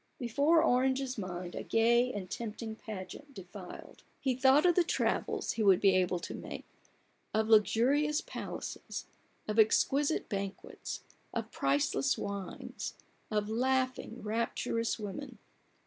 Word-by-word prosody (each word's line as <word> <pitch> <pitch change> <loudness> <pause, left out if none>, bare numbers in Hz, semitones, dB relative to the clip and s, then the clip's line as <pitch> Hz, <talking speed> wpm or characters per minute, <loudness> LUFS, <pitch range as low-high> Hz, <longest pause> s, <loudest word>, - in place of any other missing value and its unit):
Before 285 +7 +3
Orange's 260 -1 +2
mind 180 -2 -5
a - - -4
gay 235 +2 +3
and 200 -5 -5
tempting 220 +2 -5
pageant 220 +7 -8
denied. 185 0 -10 0.2
He 265 -2 +1
thought 265 +5 +5
of 350 - +6
the 360 - +4
travels 335 - 0
he 230 - -3
would 195 -4 +6
be 195 -2 +5
able 180 -1 +2
to - - -5
make, - - -7 0.7
of 220 0 +1
luxurious 265 +8 +4
palaces, - - -6 0.4
of 215 +1 0
exquisite 280 +7 +3
banquets, 200 -1 -5 0.3
of 225 -1 -3
priceless 135 0 +1
wines, 200 -2 -5 0.3
of 210 -1 0
laughing, 255 +1 0
rapturous 230 +1 -1
women. 235 +4 -6
225 Hz, 125 wpm, -32 LUFS, 200-260 Hz, 0.7 s, of